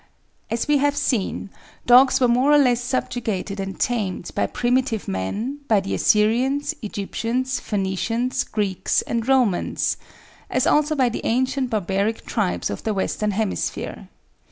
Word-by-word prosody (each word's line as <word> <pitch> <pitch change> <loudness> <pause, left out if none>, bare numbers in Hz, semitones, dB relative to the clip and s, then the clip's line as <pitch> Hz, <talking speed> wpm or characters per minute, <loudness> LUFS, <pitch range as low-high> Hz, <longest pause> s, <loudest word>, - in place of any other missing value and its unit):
As 230 +3 -2
we 295 -1 +3
have 290 +1 +1
seen, 205 -4 -1 0.3
dogs 255 +2 +6
were 250 - +4
more 250 +4 +3
or - - +7
less 250 -4 +3
subjugated 220 -5 -2
and 195 0 -5
tamed 200 -7 -1
by - - 0
primitive 245 -3 0
man, 205 - -3
by 215 -3 +4
the 195 0 -4
Assyrians, 250 +8 +2
Egyptians, 230 +4 -2
Phoenicians, 215 +5 -1
Greeks, 200 -4 -1
and 235 0 -2
Romans, 250 -9 +1 0.5
as - - +1
also 300 +1 +3
by 260 -4 +3
the 235 - -4
ancient 260 +2 0
barbaric 200 +1 -1
tribes 90 +1 -1
of 100 - -5
the 215 -2 -2
western 210 +2 -1
hemisphere. 205 0 -3
230 Hz, 140 wpm, -22 LUFS, 200-255 Hz, 0.5 s, or